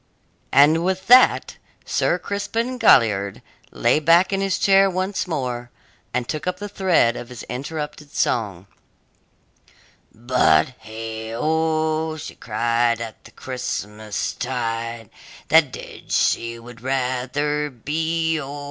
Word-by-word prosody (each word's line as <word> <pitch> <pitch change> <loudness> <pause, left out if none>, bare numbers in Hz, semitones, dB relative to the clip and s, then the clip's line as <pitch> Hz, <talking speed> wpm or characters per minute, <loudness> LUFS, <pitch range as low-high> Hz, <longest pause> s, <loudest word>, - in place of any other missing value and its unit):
And 155 +4 +5
with 190 +1 -1
that 250 +4 +5 0.3
Sir 175 - +1
Crispin 225 +7 -3
Galliard 100 - +3 0.3
lay - - +2
back 170 +5 +4
in 195 - 0
his 195 -1 0
chair 195 0 +4
once 185 +1 -2
more, 125 -7 -3 0.4
and 125 -1 -2
took 155 +1 -4
up 180 0 -1
the 205 +2 -6
thread 185 -12 +2
of 120 - -7
his 125 -3 -9
interrupted 150 +2 -6
song 100 -7 -1 1.5
But, 110 -10 +2
heigh 110 0 -7
o! 160 +2 0
she 155 - -8
cried, 115 0 0
at 115 -2 -8
the - - -13
Christmas 105 -5 -4
tide, 115 -3 -4 0.4
That - - +5
dead - - -10
she 115 0 +1
would 115 0 -13
rather 135 +3 -1
be 160 +5 -1
O! 140 +1 -7
135 Hz, 120 wpm, -22 LUFS, 115-160 Hz, 1.5 s, And